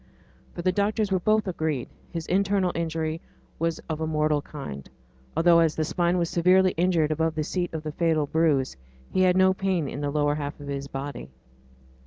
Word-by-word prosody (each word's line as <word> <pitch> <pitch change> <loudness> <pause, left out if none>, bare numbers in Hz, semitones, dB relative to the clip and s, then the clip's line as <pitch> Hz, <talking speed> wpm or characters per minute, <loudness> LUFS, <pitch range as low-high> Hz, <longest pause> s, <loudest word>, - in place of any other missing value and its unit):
For 175 - -5
the 185 - +3
doctors 205 +2 0
were 190 - +2
both 215 +3 +2
agreed; 160 -7 -2 0.2
his 165 -2 -4
internal 195 -1 +1
injury 160 -1 -2 0.4
was 165 -1 0
of 160 -1 -3
a 160 - 0
mortal 150 -1 +1
kind, 70 - -8 0.5
although, 170 0 +6
as 165 -2 +3
the 160 - 0
spine 175 +2 +1
was 170 -1 +1
severely 185 +2 +4
injured 165 -3 +2
above 160 +1 0
the 155 - 0
seat 175 +3 -2
of 160 -1 -5
the 155 - -4
fatal 160 -1 +1
bruise, 145 -4 +1 0.4
he 185 - +1
had 185 0 +4
no 190 0 +5
pain 190 -5 -1
in 140 - -5
the 145 - -1
lower 145 0 +1
half 145 +1 -5
of 145 - -9
his 140 0 -4
body. 135 - -6
165 Hz, 195 wpm, -26 LUFS, 150-180 Hz, 0.5 s, although